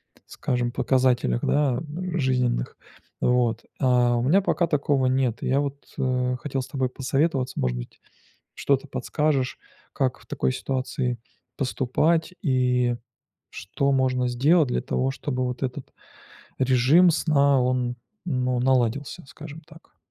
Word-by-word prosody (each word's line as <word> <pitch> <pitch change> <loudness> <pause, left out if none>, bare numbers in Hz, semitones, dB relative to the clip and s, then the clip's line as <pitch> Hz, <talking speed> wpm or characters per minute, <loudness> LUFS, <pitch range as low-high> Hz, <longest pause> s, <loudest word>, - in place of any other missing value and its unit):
п - - -26
скажем, 120 -1 -2
показателях, 125 - +1
да, 140 -4 +2 0.4
жизненных, 125 - 0 0.4
вот. 120 -2 +1
А 125 -2 +3
у - - 0
меня 180 +10 +4
пока 175 -2 +1
такого 140 -3 +1
нет, 130 -3 0
и - - -1
я 135 +2 +2
вот, 140 0 -5
э, 125 -1 0
хотел 135 -2 -2
с 130 - -8
тобой 130 -2 -1
посоветоваться, 135 0 -1
может 60 -1 0
быть, - - -9 0.5
что-то 140 0 0
подскажешь, 140 -2 -1 0.3
как 130 -2 -1
в - - -20
такой - - -1
ситуации 130 -2 -2 0.4
поступать 155 +6 0
и 125 -3 +1 0.6
что 140 +8 -2
можно 130 -1 +1
сделать 145 +5 +3
для 125 - -1
того, 130 +1 -1
чтобы 130 -2 -3
вот 125 +1 -4
этот 130 +1 -4 0.7
режим 130 +7 +5
сна, 140 -4 +3
он, 125 -1 0 0.3
ну 125 -5 0
наладился, 130 +5 0
скажем 150 +3 -10
так. 155 +1 -19
130 Hz, 135 wpm, -24 LUFS, 125-140 Hz, 0.7 s, режим